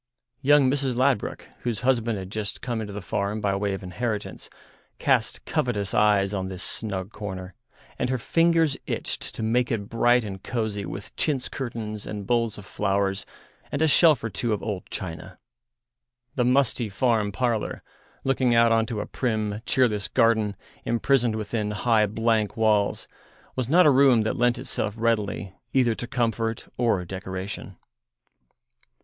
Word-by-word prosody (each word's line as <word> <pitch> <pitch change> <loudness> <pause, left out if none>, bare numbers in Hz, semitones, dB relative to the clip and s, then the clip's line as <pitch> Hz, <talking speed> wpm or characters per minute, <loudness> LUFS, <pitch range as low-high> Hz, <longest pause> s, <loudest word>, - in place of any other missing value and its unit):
Young 145 0 +5
Mrs. 135 -1 0
Ladbruk, 130 -3 0
whose 120 -4 -3
husband 120 -3 +1
had 95 0 -7
just 105 -2 -4
come 120 -3 -2
into 105 -2 -5
the 100 -1 -6
farm 100 +3 -2
by 100 -2 0
way 100 0 -1
of 95 - -8
inheritance, 105 +3 -4 0.5
cast - - +1
covetous 105 -6 -1
eyes 105 -2 +3
on 95 -2 -2
this 95 -1 -6
snug 100 -3 -3
corner, 95 -3 -6 0.5
and 125 - 0
her 130 - +1
fingers 165 +3 +3
itched - - -2
to - - -4
make 120 +2 +1
it 105 -3 -2
bright 120 +1 +3
and 95 -3 -6
cosy 110 -5 -3
with 100 +5 -8
chintz 140 -5 0
curtains 110 -5 -5
and 105 -2 -5
bowls 115 -1 +1
of 105 - -10
flowers, 100 -1 -1 0.4
and 140 - -2
a - - +5
shelf 155 -4 +5
or 115 - -1
two 115 +3 -1
of 105 - -3
old 105 -4 -4
china. 85 -3 -6 1.0
The 125 - +1
musty 125 -3 +2
farm 105 0 +1
parlour, 115 -1 -1 0.4
looking 130 -2 +2
out 115 0 +5
on 115 0 +3
to 110 -2 -3
a - - -4
prim, 110 -4 -2
cheerless 110 -6 +2
garden 110 -3 +2 0.3
imprisoned 120 0 +2
within 105 0 -2
high, 110 0 +2
blank 110 0 0
walls, 105 -2 +2 0.5
was 130 -2 -2
not 180 +4 +6
a 150 - +7
room 130 -4 +5
that 110 - -1
lent 120 0 +2
itself 105 -3 -2
readily 105 -4 -1 0.2
either 125 -3 +3
to 120 - -6
comfort 115 -2 -1
or 115 -7 +1
decoration. 95 +1 -6
110 Hz, 160 wpm, -25 LUFS, 100-125 Hz, 1.0 s, a